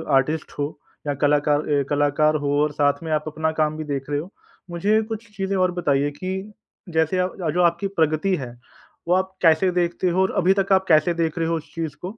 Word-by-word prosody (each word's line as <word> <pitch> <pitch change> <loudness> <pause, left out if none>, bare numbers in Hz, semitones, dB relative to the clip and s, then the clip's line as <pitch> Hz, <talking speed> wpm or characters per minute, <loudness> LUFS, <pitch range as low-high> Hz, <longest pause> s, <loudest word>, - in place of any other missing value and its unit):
Artist 150 +4 0
हो 145 - +1 0.4
या 145 - +1
कलाकार 145 +1 +2
ए 140 -1 +2
कलाकार 145 +1 +2
हो 145 -1 -1
और 150 - 0
साथ 145 +1 +1
में 160 - -4
आप 150 0 +1
अपना 160 +1 -1
काम 155 -1 0
भी 155 - -4
देख 140 -1 -4
रहे 145 - 0
हो, 175 +7 -8 0.4
मुझे 205 +6 +2
कुछ 220 0 -6
चीज़ें 195 0 -1
और 185 -1 +2
बताइए 145 -5 0
कि 190 +6 -5 0.4
जैसे 160 +2 +1
आप 180 0 -1 0.2
जो 180 - +2
आपकी 170 +3 +2
प्रगति 165 +1 +1
है 130 -7 -6 0.6
वो 175 - +3
आप 190 0 -1
कैसे 165 +2 +4
देखते 175 +1 0
हो 185 +2 +1
और 190 - +2
अभी 190 +1 +4
तक 195 0 -1
आप 190 0 +3
कैसे 155 +1 +4
देख 165 0 -1
रहे 165 - 0
हो 165 - 0
उस 160 0 -11
चीज़ 165 -3 -4
को? 195 +5 -7
165 Hz, 220 wpm, -23 LUFS, 150-185 Hz, 0.6 s, कैसे